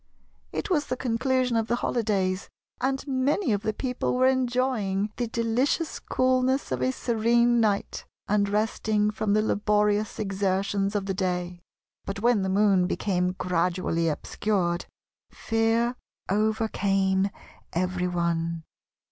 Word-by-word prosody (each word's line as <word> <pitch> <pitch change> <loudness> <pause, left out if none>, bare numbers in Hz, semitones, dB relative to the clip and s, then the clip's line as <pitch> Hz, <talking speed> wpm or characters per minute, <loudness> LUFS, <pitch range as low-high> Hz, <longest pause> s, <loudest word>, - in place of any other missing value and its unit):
It - - -4
was 300 -4 +1
the 255 - -2
conclusion 250 +1 0
of 225 -1 +1
the 240 - +1
holidays, 200 -6 -1 0.3
and 270 +2 -1
many 270 - +1
of 200 - 0
the 215 - 0
people 250 +2 -2
were 255 +1 +3
enjoying 245 -6 +1
the 240 - -1
delicious 235 +8 0
coolness 255 - +1
of 130 -1 -1
a 130 - +2
serene 235 - +2
night, 205 -2 0 0.2
and 200 0 +2
resting 210 0 +1
from 210 -1 -1
the 215 0 +3
laborious 210 0 +1
exertions 195 0 -1
of 200 -1 0
the 195 - -1
day; 180 -2 -2 0.4
but 195 0 -5
when 235 -1 +3
the 190 - -1
Moon 195 -2 +3
became 180 -2 0
gradually 180 -2 0
obscured, 175 +2 -1 0.4
fear 225 +2 0 0.3
overcame 200 -2 +1 0.4
every 180 +1 -1
one. 170 -1 -1
210 Hz, 130 wpm, -26 LUFS, 190-240 Hz, 0.4 s, were